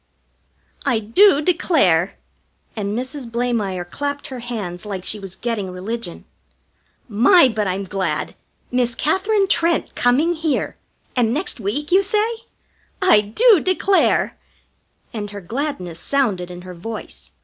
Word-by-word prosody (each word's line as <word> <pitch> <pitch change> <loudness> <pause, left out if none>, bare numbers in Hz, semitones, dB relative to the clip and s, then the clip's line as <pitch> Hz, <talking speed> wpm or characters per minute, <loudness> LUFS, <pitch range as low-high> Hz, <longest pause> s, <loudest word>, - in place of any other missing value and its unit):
"I 250 -5 +2
do 285 - +4
declare!" 285 - +2 0.6
And 205 0 -2
Mrs. 255 0 -5
Blamire 225 -7 -1
clapped 285 +9 -4
her 260 -2 -6
hands 210 -8 -5
like 195 -3 -5
she 210 - -1
was 195 -2 -7
getting 225 -5 -3
religion. 185 +1 -5 0.8
"My, 260 - +6
but 215 -4 -1
I'm 190 +2 -2
glad! 190 0 -2 0.4
Miss 245 -1 +1
Katherine 390 - +1
Trent 340 -3 +1
coming 275 +8 +2
here! 320 -3 -1 0.4
And 235 -3 +2
next 300 +1 0
week, 280 - -3
you 380 +2 +6
say? 425 +4 0 0.6
I 370 - +5
do 390 - +4
declare!" 375 +3 +2 0.8
And 210 -2 -4
her 205 0 -7
gladness 190 - -4
sounded 210 -11 0
in 180 0 -9
her 185 0 -9
voice. 215 +6 -8
235 Hz, 130 wpm, -20 LUFS, 200-305 Hz, 0.8 s, My